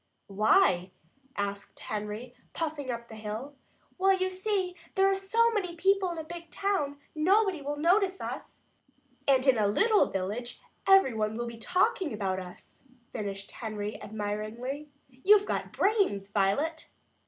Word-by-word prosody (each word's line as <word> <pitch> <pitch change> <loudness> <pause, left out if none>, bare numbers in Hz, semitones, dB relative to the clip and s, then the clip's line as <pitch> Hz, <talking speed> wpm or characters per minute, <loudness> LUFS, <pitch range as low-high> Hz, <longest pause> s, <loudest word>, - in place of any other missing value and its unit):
"Why?" 195 - +3 0.5
asked 200 0 -4
Henry, 215 +3 -5 0.2
puffing 300 -4 -3
up 235 -1 -4
the 225 - -11
hill. 220 +6 -6 0.5
"Well, 385 0 +4
you 375 0 0
see, 375 -1 -1 0.2
there 385 0 +4
are 390 - +4
so 450 +5 +2
many 375 -6 -2
people 390 +2 +2
in 340 - -6
a 320 - -4
big 340 +1 -9
town, 370 -8 -1 0.2
nobody 375 +2 +3
will 290 +1 -3
notice 375 +4 +2
us - - -7 0.3
" - - -37
"And 265 -1 +4
in 260 -4 +5
a 210 - +3
little 430 - +4
village 210 +6 -4 0.3
everyone 225 - +4
would 240 0 -3
be 235 - -9
talking 370 - +1
about 195 -3 -1
us," 180 -1 -12 0.3
finished 195 -3 -5
Henry 210 -2 -5
admiringly. 220 +7 -4 0.2
"You've 390 +11 +4
got - - -2
brains, 385 - +1
Violet!" 210 +12 0
280 Hz, 145 wpm, -29 LUFS, -, 0.5 s, in